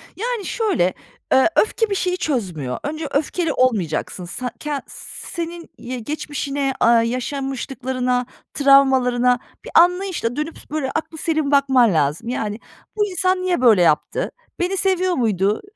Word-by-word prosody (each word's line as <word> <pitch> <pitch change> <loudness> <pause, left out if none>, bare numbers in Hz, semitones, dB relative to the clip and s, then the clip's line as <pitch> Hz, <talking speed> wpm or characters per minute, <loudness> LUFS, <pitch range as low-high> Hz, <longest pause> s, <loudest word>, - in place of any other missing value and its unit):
Yani, 465 -1 -3
şöyle, 380 - +1 0.4
eee, 265 +5 +5
öfke 445 +1 +2
bir 400 - 0
şeyi 365 -1 0
çözmüyor. 185 - -2
Önce 310 +1 -4
öfkeli 310 +3 0
olmayacaksın. 185 -7 0
Sa 250 +8 -5
ken 295 -2 -3
senin 340 0 -7
y 250 +1 -6
geçmişine, 280 +1 -3
aaa, 230 0 +5
yaşanmışlıklarına, 255 0 -2 0.3
travmalarına 260 -3 +4 0.3
bir - - -8
anlayışla 355 -8 +3
dönüp 305 +3 -4
s - - -14
böyle 290 -3 -2
aklıselim 315 -2 -2
bakman 265 -6 +4
lazım. 155 +7 0
Yani, 215 -3 -3 0.4
bu 420 -1 +2
insan 370 -1 0
niye 365 -6 0
böyle 225 -7 +6
yaptı? 160 -3 +1 0.3
Beni 360 +2 0
seviyor 370 -1 +1
muydu? 210 - +1
275 Hz, 135 wpm, -21 LUFS, 240-340 Hz, 0.4 s, böyle